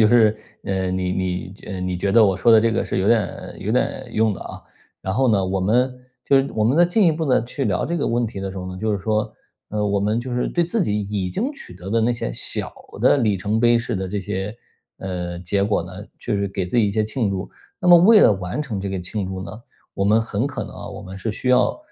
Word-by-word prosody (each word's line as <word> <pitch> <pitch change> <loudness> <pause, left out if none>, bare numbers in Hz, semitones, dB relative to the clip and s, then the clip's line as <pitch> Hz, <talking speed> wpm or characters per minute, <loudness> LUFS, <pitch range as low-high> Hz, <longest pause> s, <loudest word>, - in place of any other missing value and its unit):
就 110 - +6
是， 110 -3 +5 0.3
呃， 95 -1 -1
你 90 0 -1
你 95 - -1 0.2
你 95 - -11
觉 95 -1 -7
你 90 -1 -2
觉 100 +2 -1
得 115 0 +7
我 95 -2 +2
说 115 +5 +3
的 110 - +8
这 115 0 +2
个 115 - 0
是 - - -2
有 95 - 0
点 115 -4 0
有 105 - -3
点 130 +1 -1
用 110 -1 +2
的 - - -8
啊。 - - -8 0.4
然 95 - -2
后 130 +1 +2
呢， 100 -4 +3
我 95 0 -1
们， 125 +7 +2 0.3
就 140 - +4
是 135 - 0
我 110 -1 +1
们 130 +7 +2
呢 175 - +6
进 180 +2 +3
一 165 - +5
步 160 +1 -2
地 130 -5 +3
去 135 +3 -4
聊 100 -4 0
这 170 - -2
个 - - -1
问 120 0 +1
题 100 -2 -7
的 95 - -4
时 95 - -7
候 90 - -6
呢， 95 - -8
就 110 0 0
是 100 - -1
说， 110 +2 -1 0.4
呃， 105 0 -1
我 100 0 +1
们 105 +3 +1
就 120 0 -4
是 125 - 0
对 175 -1 +1
自 205 +6 -1
己 105 - 0
已 100 -2 -2
经 250 - -2
取 185 - -12
得 95 +2 -8
的 115 - +2
那 120 +2 +2
些 - - -4
小 - - -3 0.3
的 145 - +5
里 105 -5 +2
程 105 +4 -1
碑 120 0 +5
式 120 0 -3
的 95 0 -3
这 100 +2 -2
些， 95 +4 -4 0.4
呃， 90 -2 -4
结 100 +2 0
果 100 -4 +1
呢， 90 - -10 0.3
就 115 - -2
是 100 0 0
给 95 -1 -3
自 105 - -3
己 105 - +4
一 - - 0
些 110 +1 0
庆 110 -2 -1
祝。 95 0 -3 0.3
那 180 - -3
么 175 - +10
为 205 +5 +7
了 110 - +6
完 95 +7 -3
成 115 -10 -4
这 100 - -3
个 95 -1 -3
庆 95 +2 -4
祝 95 0 -5
呢， 95 - -8 0.4
我 100 - -1
们 110 +2 +4
很 115 +3 -1
可 130 -6 -4
能 - - -10
啊， - - -8
我 - - -8
们 95 +1 -9
是 110 +3 -3
需 125 +4 -4
要 125 - +3
105 Hz, 300 characters per minute, -22 LUFS, 95-120 Hz, 0.4 s, 么